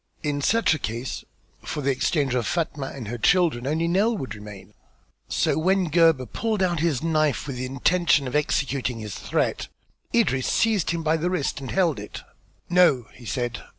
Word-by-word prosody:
In 145 -1 -1
such 225 +4 +3
a 155 - -2
case 120 +2 -4 0.4
for 150 - -4
the 140 0 +1
exchange 135 0 0
of 120 -4 0
Fatma 155 -5 -2
and 130 -6 -7
her 120 +2 -5
children 155 - +2
only 160 +3 0
Nell 205 +6 +2
would 130 - -5
remain. 105 -2 -11 0.6
So - - +1
when 185 0 +1
Gebhr 165 -5 +4
pulled 215 - -1
out 175 -3 +1
his 160 -5 0
knife 155 -3 +1
with 135 -4 -5
the 130 +1 -3
intention 145 +2 +2
of 125 - -5
executing 140 -4 0
his 105 -3 -6
threat, - - -1 0.4
Idris 170 - +2
seized 220 -6 +2
him 170 -1 -1
by 160 +1 +2
the 170 +3 -1
wrist 180 -6 -1
and 135 - -6
held 170 - +1
it. 105 - -8 0.4
"No!" 170 -11 +3
he 120 - -14
said. 120 +2 -2
150 Hz, 185 wpm, -24 LUFS, 125-175 Hz, 0.6 s, Gebhr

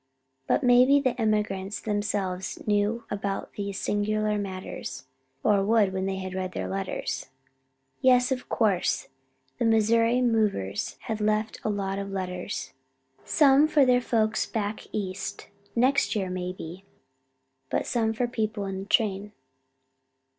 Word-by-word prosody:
But - - +2
maybe 250 +3 +6
the 255 -3 -1
emigrants 210 -2 0
themselves 200 -3 -2
knew 210 +2 +1
about 200 -1 -3
these 200 -1 -4
singular 215 +1 0
matters, 185 -9 -6 0.4
or 200 -2 +4
would 210 -2 +3
when 190 0 -1
they 195 - -1
had 190 -1 -5
read 185 -1 -3
their - - -3
letters. 195 0 -3 0.7
Yes, 250 0 +5
of 255 -1 -2
course, 200 - +1 0.5
the - - +1
Missouri 230 +2 +3
movers 210 - 0
had 220 -1 -4
left 215 +1 0
a - - 0
lot 195 -1 -2
of 200 0 -4
letters, 185 0 -4 0.5
some 285 0 +5
for 295 -3 +4
their 250 -1 +4
folks 220 -3 +1
back 210 -1 -3
East 195 -2 -4 0.3
next 255 +1 +3
year 190 -3 -1
maybe, 180 0 -5 0.9
but - - 0
some 225 -2 +1
for 240 +2 -1
people 215 -3 -2
in 190 -1 -4
the 195 - -6
train. 205 -1 +1
210 Hz, 135 wpm, -27 LUFS, 195-230 Hz, 0.9 s, maybe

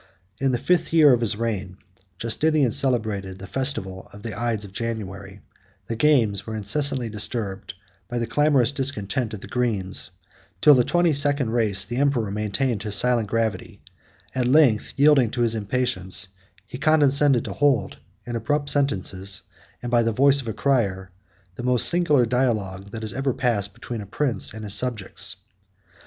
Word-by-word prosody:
In 135 -1 +1
the 125 - 0
fifth 175 +7 0
year 150 -5 +6
of 120 - +1
his 115 -2 +1
reign, 105 -5 -4 0.4
Justinian 140 +4 +1
celebrated 110 -7 -1
the 95 - -9
festival 95 -6 -3
of 100 0 -13
the 115 -4 -5
ides 115 -2 -2
of 95 - -13
January; 100 -3 -6 0.4
the 115 - -4
games 115 -8 +2
were 110 - -4
incessantly 125 +4 +1
disturbed 105 -3 -3 0.3
by 120 - -3
the 120 - -1
clamorous 135 0 +2
discontent 130 -4 -2
of 100 - -11
the - - -9
greens: 105 -9 -2 0.5
till 150 - +7
the 125 -3 +4
twenty 175 +3 +2
second 140 -4 0
race, 105 -5 0
the 120 +5 -5
emperor 130 -7 +1
maintained 105 +2 -2
his 105 -1 0
silent 120 -3 +2
gravity; 110 -4 -2 0.5
at 125 -2 0
length, 130 -5 +3
yielding 140 -4 +5
to 120 - -3
his 115 -1 +2
impatience, 100 -3 -1 0.4
he 125 +3 -9
condescended 145 -3 +3
to - - -5
hold, 135 -9 +1 0.3
in 120 - -5
abrupt 145 +6 -1
sentences, 100 -10 +1 0.4
and 120 - -4
by 120 -1 +4
the 115 0 0
voice 140 +4 +3
of 125 - -11
a 110 - -3
crier, 100 -10 -1 0.5
the - - -5
most 125 -1 +3
singular 150 -8 +3
dialogue 110 -6 -1
50 - - -19
that 110 -2 -2
ever 135 -1 -1
passed 115 -7 -1
between 120 -3 -6
a 100 - -9
prince 130 +3 -1
and 110 +1 -9
his 100 -2 -1
subjects. 120 -6 -1
115 Hz, 170 wpm, -23 LUFS, 105-135 Hz, 0.5 s, till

